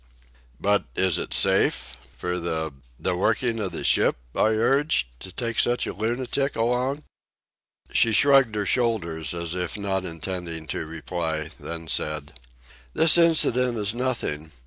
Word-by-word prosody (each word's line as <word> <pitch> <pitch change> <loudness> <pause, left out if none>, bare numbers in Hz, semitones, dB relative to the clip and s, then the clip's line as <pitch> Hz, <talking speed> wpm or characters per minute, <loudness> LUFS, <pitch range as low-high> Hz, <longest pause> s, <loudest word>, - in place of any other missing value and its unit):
"But 100 0 +2
is 95 -4 +1
it - - -6
safe... 60 0 +2 0.2
for 90 0 -3
the... 80 -2 -3 0.3
the 90 - -1
working 115 +5 0
of 95 -4 -2
the 85 - -5
ship," - - +3 0.2
I - - +2
urged, 115 - +1
"to 95 - -9
take 115 +3 -3
such 120 0 +2
a - - -4
lunatic 125 +5 -1
along?" 125 +5 0 0.9
She 115 - +4
shrugged 135 -1 +5
her 105 -1 -1
shoulders, 85 - 0
as 85 -1 -3
if 90 +2 -3
not 95 -2 -2
intending 85 -1 -4
to 80 - -4
reply, 80 0 -4
then 85 -1 -7
said: 75 -2 -2 0.6
"This 160 -1 +6
incident 125 -8 +3
is 105 0 0
nothing. 115 -12 -2
95 Hz, 145 wpm, -25 LUFS, 80-120 Hz, 0.9 s, This